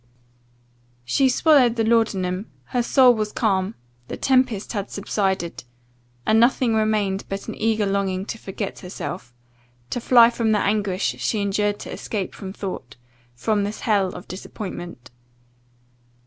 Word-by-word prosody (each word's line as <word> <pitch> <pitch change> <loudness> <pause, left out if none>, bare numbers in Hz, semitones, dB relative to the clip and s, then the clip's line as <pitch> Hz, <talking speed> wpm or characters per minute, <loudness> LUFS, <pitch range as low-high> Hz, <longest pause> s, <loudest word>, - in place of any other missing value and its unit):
"She 265 - +3
swallowed 255 -3 +4
the 225 - +1
laudanum; 205 -4 +1 0.3
her 245 - +2
soul 250 +1 +5
was 215 -2 -2
calm 195 -2 0 0.3
the - - -6
tempest 255 -6 +1
had 205 -2 -3
subsided 190 - -2 0.6
and 220 +1 +4
nothing 240 0 +3
remained 215 -3 +1
but 195 0 -5
an - - -4
eager 220 -1 0
longing 195 -1 -1
to 225 - -6
forget 195 0 -5
herself 180 -6 -6 0.6
to 245 - -2
fly 235 -1 +6
from 225 -2 +1
the 210 - +3
anguish 200 -2 0
she 220 - 0
endured 205 +1 0
to - - -7
escape 200 -4 -4
from 190 -2 -7
thought 185 - -6 0.4
from 205 - 0
this 205 +1 -4
hell 200 -5 +1
of - - -9
disappointment. 180 - -8
205 Hz, 140 wpm, -23 LUFS, 190-225 Hz, 0.6 s, fly